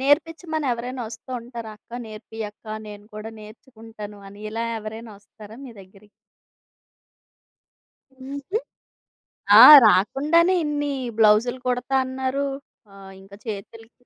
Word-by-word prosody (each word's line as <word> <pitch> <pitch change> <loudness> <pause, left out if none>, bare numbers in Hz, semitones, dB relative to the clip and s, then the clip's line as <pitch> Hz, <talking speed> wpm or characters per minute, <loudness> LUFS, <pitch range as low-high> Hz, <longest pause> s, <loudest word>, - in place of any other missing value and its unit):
నేర్పిచ్చమని 315 +2 0
ఎవరైనా 245 +2 -5
వస్తూ 225 +3 -12
ఉంటారా? 235 -2 -9
"అక్క 235 +2 -10
నేర్పియి 220 +1 -8
అక్కా, 215 +1 -9
నేను 205 0 -11
కూడా 215 +1 -7
నేర్చుకుంటాను" 215 -1 -12
అని 200 +1 -14
ఇలా 225 +1 -3
ఎవరైనా 220 +1 -9
వస్తారా 210 +1 -15
మీ 255 - -10
దగ్గరికి? 195 +2 -19 2.0
హుహు. 275 +9 -5 1.0
ఆ! - - +12 0.2
రాకుండానే 300 - +3
ఇన్ని 290 -1 -2 0.3
బ్లౌజ్లు 225 +3 +3
కుడతాన్నారు. 260 +2 -1 0.5
ఆహ్, 195 -1 -13
ఇంక 195 +1 -18
చేతులికి 225 +2 -8
230 Hz, 105 wpm, -23 LUFS, 215-265 Hz, 2.0 s, ఆ